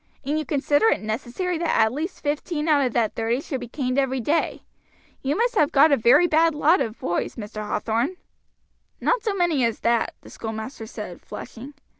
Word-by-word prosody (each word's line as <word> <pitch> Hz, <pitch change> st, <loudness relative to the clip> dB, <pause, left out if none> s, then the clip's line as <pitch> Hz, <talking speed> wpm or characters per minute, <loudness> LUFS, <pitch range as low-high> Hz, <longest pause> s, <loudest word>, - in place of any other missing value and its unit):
"And 295 Hz, +3 st, 0 dB
you 310 Hz, -, -3 dB
consider 290 Hz, +7 st, +2 dB
it -, -, +2 dB
necessary 255 Hz, -, -3 dB
that 340 Hz, -1 st, +1 dB
at 220 Hz, +1 st, +3 dB
least 320 Hz, +7 st, -5 dB
fifteen 300 Hz, +2 st, -2 dB
out 295 Hz, -3 st, +4 dB
of 245 Hz, -, -6 dB
that 225 Hz, -3 st, +1 dB
thirty 230 Hz, +2 st, 0 dB
should 275 Hz, -2 st, -4 dB
be 245 Hz, -, -7 dB
caned 255 Hz, +1 st, -1 dB
every 265 Hz, -1 st, 0 dB
day. 295 Hz, +8 st, 0 dB, 0.6 s
You 280 Hz, +4 st, -1 dB
must 480 Hz, +2 st, +1 dB
have 305 Hz, -8 st, +3 dB
got 295 Hz, +2 st, +6 dB
a -, -, +6 dB
very 260 Hz, +8 st, +5 dB
bad 325 Hz, -1 st, +3 dB
lot 310 Hz, +5 st, +4 dB
of 225 Hz, 0 st, -3 dB
boys, 175 Hz, -, -2 dB
Mr. 215 Hz, -2 st, -8 dB
Hathorn?" 230 Hz, -, -1 dB, 0.8 s
"Not -, -, +1 dB
so 415 Hz, -2 st, -1 dB
many 345 Hz, -8 st, +2 dB
as 230 Hz, -1 st, 0 dB
that," 235 Hz, -1 st, +1 dB
the -, -, -14 dB
schoolmaster 220 Hz, +1 st, -6 dB
said, 210 Hz, -6 st, -8 dB
flushing. 265 Hz, +5 st, -9 dB
275 Hz, 195 wpm, -24 LUFS, 230-320 Hz, 0.8 s, got